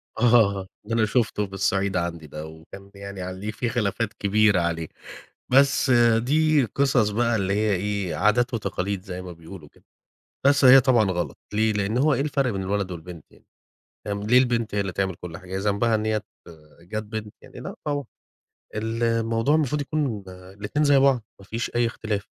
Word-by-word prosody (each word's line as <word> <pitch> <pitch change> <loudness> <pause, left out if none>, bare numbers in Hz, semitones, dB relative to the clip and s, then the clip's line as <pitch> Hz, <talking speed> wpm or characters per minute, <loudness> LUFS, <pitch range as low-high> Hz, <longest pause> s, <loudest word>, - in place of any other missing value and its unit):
آه 110 -5 +3 0.2
ده 115 - -4
أنا 115 -1 +3
شُفته 110 -2 0
هي - - -4
الصعيد 95 0 0
عندي 85 -2 -3
ده، 75 +1 -7
وكان 80 +5 -12
ب 100 - -25
يعني 100 -1 -8
عليه 95 +3 -5
في 115 +2 -3
خلافات 115 -2 -1
كبيرة 100 -1 +3
عليه. 80 -1 -2 0.6
بس 135 +1 +4 0.3
دي 150 +3 +2
قصص 125 -1 +2
بقى 115 +2 +1
اللي 100 -2 0
هي 105 0 +1
إيه، 100 -1 -2
عادات 120 +4 +2
وتقاليد 100 -3 -2
زي 90 -2 -6
ما 90 -1 -8
بيقولوا 85 -1 -12
كده. - - -26 0.6
بس 140 0 +4
هي 130 +1 +9
طبعًا 120 -6 +3
غلط، 90 -1 -3
ليه؟ 110 +1 +2
لأنه 105 +3 0
هو 150 +1 +3
إيه - - -1
الفرق 140 -3 0
بين 95 -1 -3
الولد 100 0 -2
والبنت 85 -2 -9
يعني؟ - - -22 0.6
فاهم، 100 0 -3
ليه 115 +4 +4
البنت 120 -4 +1
هي 100 - +2
اللي 95 - -3
تعمل 95 0 -2
كل 85 -1 -8
حاجة؟ 95 +2 -6
ذنبها 105 +3 +1
إن 110 0 -1
هي 110 0 +1
ات 105 -2 -3 0.6
جات 105 +5 -5
بنت؟ 110 -1 -6
يعني - - -13
لأ - - -7
طبعًا. 145 -1 -1 0.7
الموضوع 115 +3 0
المفروض 150 -2 +1
يكون، 140 -8 -2
آآ، 90 0 -12
الاتنين 105 +10 -2
زي 145 -1 +5
بعض، 135 -3 +3 0.2
ما - - -13
فيش 115 +4 -4
أي 120 0 +2
اختلاف، 110 -3 -3
105 Hz, 190 wpm, -24 LUFS, 95-120 Hz, 0.7 s, هي